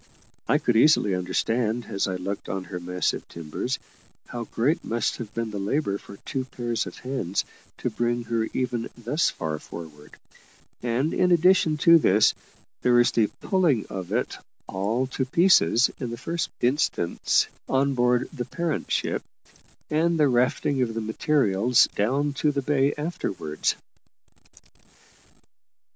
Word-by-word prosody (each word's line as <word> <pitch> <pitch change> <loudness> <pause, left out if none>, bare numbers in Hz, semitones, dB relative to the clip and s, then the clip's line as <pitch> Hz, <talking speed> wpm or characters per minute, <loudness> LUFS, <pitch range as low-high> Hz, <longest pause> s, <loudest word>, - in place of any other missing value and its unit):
I - - +4
could 120 - 0
easily 115 -5 +5
understand, 110 +6 -1
as 100 -2 -1
I 95 - -2
looked 100 +2 -5
on 95 -1 -3
her 90 -1 -6
massive 90 +1 -2
timbers, 85 - -4 0.5
how 120 -1 -6
great 130 +9 0
must 115 +1 -1
have 110 -4 -7
been 115 -1 -2
the 105 - -4
labour 100 0 -1
for 100 - -12
two 130 -2 -3
pair 120 -2 -5
of 100 -6 -2
hands 125 -8 -2 0.3
to - - -2
bring 120 0 -1
her 115 -1 -1
even 120 -2 -2
thus 125 +7 +1
far 80 -2 -4
forward; 75 -3 -11 0.6
and, 125 +6 0
in 180 -1 +2
addition 175 -2 +4
to 170 0 +8
this, 105 -6 +4 0.5
there 125 -1 +3
was 120 0 +5
the 110 -2 +3
pulling 170 - +2
of 95 -1 -5
it 120 +4 -1 0.3
all 105 +7 -1
to 130 +1 -2
pieces, 130 - +4
in 125 - -3
the 120 - -5
first 165 +5 -3
instance, 120 - +1 0.2
on 135 +1 +2
board 125 0 +2
the 125 -5 -4
parent 170 -4 -3
ship, - - 0 0.7
and 165 +2 +2
the 150 - +5
rafting 125 +2 +1
of 115 -3 -1
the 115 - -1
materials 110 -1 +3
down 140 +8 +1
to 150 +2 +1
the 140 -1 -2
bay 140 0 +2
afterwards. 100 - -2
120 Hz, 150 wpm, -25 LUFS, 100-140 Hz, 0.7 s, to